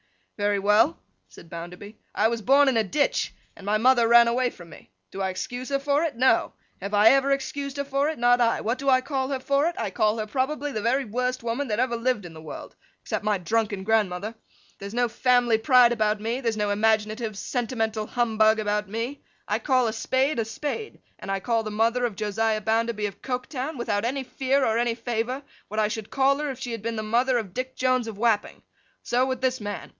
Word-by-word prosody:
'Very 205 0 +1
well,' 210 +10 +3 0.3
said - - -14
Bounderby. 180 +5 -8 0.2
'I 215 - +3
was 230 -1 -3
born 275 +5 +5
in 265 - +3
a 225 - +3
ditch, 285 +8 0 0.2
and - - -14
my 205 +2 +1
mother 240 0 +4
ran 235 0 +7
away 245 +2 +1
from 175 -7 -14
me. - - -15 0.2
Do 195 - -6
I 190 - 0
excuse 245 +7 -5
her 275 - +1
for 285 +1 +1
it? 315 -5 -2
No. 255 +3 +2 0.3
Have 200 +2 -3
I 210 +2 +7
ever 275 0 +3
excused 280 0 -2
her 280 - -2
for 280 +2 0
it? 315 - -4
Not 245 +1 +4
I. 230 -1 +2
What 230 +4 -1
do 275 0 0
I 255 -1 +5
call 265 -1 -2
her 270 -1 -2
for 280 +3 +1
it? 340 - -2
I 215 -4 -2
call 215 +2 +1
her 215 - -2
probably 280 +6 -2
the 215 - -3
very 245 +4 +1
worst 250 +3 -2
woman 235 +5 -2
that 215 -1 -1
ever 250 -1 +1
lived 235 -4 -1
in 170 - -9
the 160 - -11
world, 155 - -9 0.3
except - - -3
my 210 -1 +1
drunken 205 +2 -1
grandmother. 210 -1 0 0.5
There's 200 +3 -7
no 245 0 +2
family 240 -1 +2
pride 250 0 +5
about 215 -2 +1
me, 230 +4 -2
there's 230 -3 -1
no 210 -1 0
imaginative 215 +1 0
sentimental 225 -2 -2
humbug 220 -2 +2
about 210 -1 -1
me. 235 +6 -4 0.3
I - - 0
call 255 -4 +2
a 220 - -2
spade 260 +4 0
a 225 - 0
spade; 295 - -5 0.2
and - - -9
I 195 0 0
call 230 +3 0
the 215 - -5
mother 225 +3 +1
of 230 -4 -3
Josiah 215 +2 0
Bounderby 225 0 0
of 200 - -6
Coketown, 260 +3 -4
without 205 -4 -1
any 265 +3 -1
fear 265 +1 0
or 225 +1 +1
any 235 -1 0
favour, 240 +3 -3 0.2
what 215 - -3
I 215 - +3
should 220 -1 -5
call 275 +1 +2
her 300 -1 -2
if 265 - -5
she 250 -2 -5
had 230 -2 -5
been 230 +1 -3
the 215 - -3
mother 245 +4 +2
of 205 -6 -4
Dick 255 +2 -4
Jones 255 -2 +1
of 220 -3 -7
Wapping. 220 -2 0 0.4
So, 250 +2 +1
with 260 -1 -3
this 260 -2 0
man. 205 -1 -5
230 Hz, 225 wpm, -25 LUFS, 215-260 Hz, 0.5 s, ran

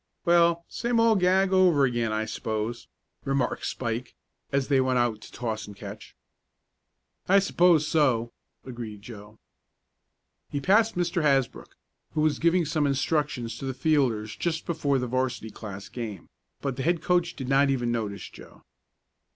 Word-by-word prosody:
"Well, 170 -1 +4
same 235 -1 -1
old 225 -3 +4
gag 190 +1 +3
over 180 -7 +5
again 120 -3 -1
I 110 0 -1
suppose," 110 +1 -4 0.4
remarked 135 -2 -1
Spike, 120 0 -4 0.4
as 140 -1 0
they 135 -2 +3
went 130 -1 +1
out 120 -3 0
to - - -12
toss 110 -3 -4
and 105 - -10
catch. 105 +1 -10 1.1
"I 195 - +6
suppose 175 -5 +4
so," 125 -8 +1 0.3
agreed 115 -5 -8
Joe. 105 -2 -11 1.1
He 145 - -2
passed 215 +8 +3
Mr. 175 0 0
Hasbrook, 135 -4 0 0.4
who 155 - +1
was 155 -1 +1
giving 170 +1 +3
some 150 0 0
instructions 135 -5 -1
to - - -6
the 130 -1 -3
fielders 125 -8 +1
just 165 +7 -2
before 150 -5 0
the 125 - -1
'varsity 125 -2 -2
class 100 -3 -8
game, 110 -7 -7 0.3
but 135 -3 -3
the - - -2
head 170 +3 0
coach 175 -1 +1
did 130 - -6
not 140 +1 +3
even 120 -3 0
notice 105 -5 -3
Joe. - - -15
135 Hz, 155 wpm, -26 LUFS, 115-165 Hz, 1.1 s, I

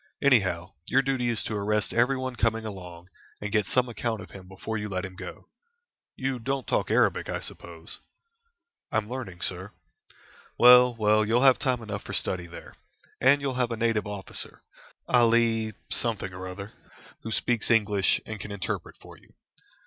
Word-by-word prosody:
Anyhow, 100 - +2
your 135 +1 +3
duty 130 -2 0
is 115 -2 -1
to - - -4
arrest 105 0 0
everyone 130 +1 +1
coming 115 -1 0
along, 90 -4 -9 0.3
and 105 0 -5
get 105 -2 +1
some 125 -1 +2
account 115 -1 -3
of 100 - -10
him 95 -2 -11
before 95 +4 -6
you 105 -1 -3
let 95 0 -3
him 95 -1 -9
go. - - -9 0.7
You 130 -1 -2
don't 135 +1 -2
talk - - 0
Arabic, - - +2
I - - -2
suppose?" 85 -1 -7 0.9
"I - - +1
am 105 -1 -1
learning, 105 -8 -6
sir." 95 +3 -1 0.8
"Well, 125 0 +8
well, 110 -1 +3
you'll 115 +4 +2
have 135 -2 +6
time 125 -4 0
enough 100 -2 -5
for - - -7
study 90 -2 -1
there. 85 - -11 0.5
And 140 +2 +5
you'll 140 -2 -1
have 120 - +1
a 115 - -3
native 110 -2 0
officer, 100 -2 -4 0.4
Ali 115 -2 +3 0.2
something 110 -5 -1
or 95 0 -7
other, 100 +3 -8 0.5
who 115 - -6
speaks 120 0 0
English, 105 -4 +3
and 110 -1 -6
can 105 - -7
interpret 95 -4 -4
for - - -14
you. - - -25
110 Hz, 170 wpm, -27 LUFS, 100-120 Hz, 0.9 s, Well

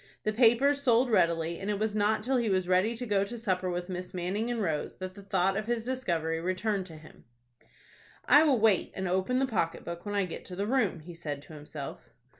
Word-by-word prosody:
The 215 - 0
papers 255 +5 +4
sold 245 -1 +3
readily, 170 -3 +2
and 200 - -4
it 205 - 0
was 215 +1 -1
not 215 +1 +1
till 260 +3 +1
he 235 -3 +1
was 185 -2 +1
ready 185 +6 +2
to 245 - -4
go 205 -3 +2
to 230 +4 -6
supper 185 -5 -1
with 175 0 -3
Miss 180 0 -6
Manning 190 +6 -2
and 240 -1 -1
Rose 160 -7 -2
that 185 0 -6
the 200 - -11
thought 195 -1 +1
of 215 +1 -3
his 235 -1 -1
discovery 170 -11 -1
returned 185 +2 -1
to 160 -3 -11
him. 155 0 -16 1.0
"I 290 - +7
will 285 -6 +3
wait 215 -4 +3
and 190 0 -2
open 190 +7 +1
the 270 - +3
pocket 185 -9 -2
book 170 0 -6
when 205 -1 -4
I 200 -2 +2
get 175 - -7
to 180 - -8
the 200 +2 -1
room," 215 -8 +1
he 175 +3 -10
said 150 -4 -5
to 150 - -13
himself. 150 -1 -8
195 Hz, 230 wpm, -29 LUFS, 175-225 Hz, 1.0 s, I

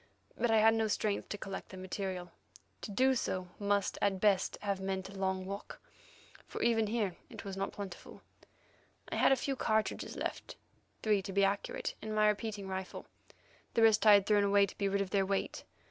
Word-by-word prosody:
But 240 - 0
I 225 - +4
had 220 +1 +6
no 225 -1 +1
strength 210 -1 -1
to 205 - -3
collect 195 -1 -6
the 190 - -9
material. 185 -1 -4 0.5
To - - -6
do 260 +6 +3
so 185 -7 -2 0.5
at 195 -2 +1
best 195 -2 +3
must - - -15
have 200 -2 -1
meant 190 0 -3
a - - -11
long 190 -1 -1
walk, 200 +1 -7 0.7
for - - -6
even 225 -2 +3
here 210 -5 -1
it - - -9
was 195 -1 -5
not 195 0 -2
plentiful. 195 -3 -9 0.9
I - - -1
had - - +5
a - - +6
few 270 +1 -2
cartridges 220 -3 -1
left—three, 210 -2 -3
to 195 - -6
be 200 +1 +3
accurate—in 200 +2 -2
my 215 0 +4
repeating 210 -1 -1
rifle; 190 0 -5 0.7
the 230 - +4
rest 220 -1 +5
I 210 - +10
had 200 -1 +6
thrown 205 -1 +4
away 200 0 +5
to - - -11
be 200 -1 +1
rid 200 0 +1
of 195 - -3
their 200 -1 +3
weight. 195 0 -2
200 Hz, 190 wpm, -33 LUFS, 190-215 Hz, 0.9 s, I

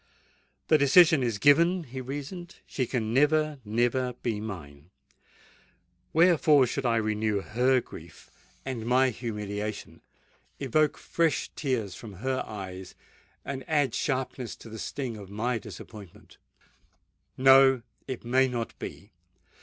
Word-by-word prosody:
"The 155 - +4
decision 160 +2 +6
is 115 -4 -1
given," 170 - +4
he 130 -2 -7
reasoned: 145 +7 -7
"she 130 -3 -3
can 115 -3 -2
never—never 130 -4 +1
be 110 -3 -1
mine! 80 -8 -8 1.2
Wherefore 155 -4 +5
should 130 +2 -2
I 115 - +2
renew 110 -2 0
her 125 +5 +2
grief 80 -6 -13 0.3
and 130 -4 -4
my 130 +1 +3
humiliation—evoke 110 +6 -4
fresh 165 -4 -1
tears 120 - -2
from 105 +2 -10
her 130 +7 -2
eyes, 95 -3 -8 0.5
and 135 -1 -5
add 145 -4 +2
sharpness 130 -3 -2
to 115 - -13
the 110 0 -8
sting 125 -3 -4
of 100 -2 -10
my 115 +4 -2
disappointment? 100 -1 -12 1.0
No: 135 -1 +6 0.2
it 130 -3 -6
may 130 +2 +3
not 120 -3 -4
be! 100 +5 -8
125 Hz, 120 wpm, -27 LUFS, 110-140 Hz, 1.2 s, decision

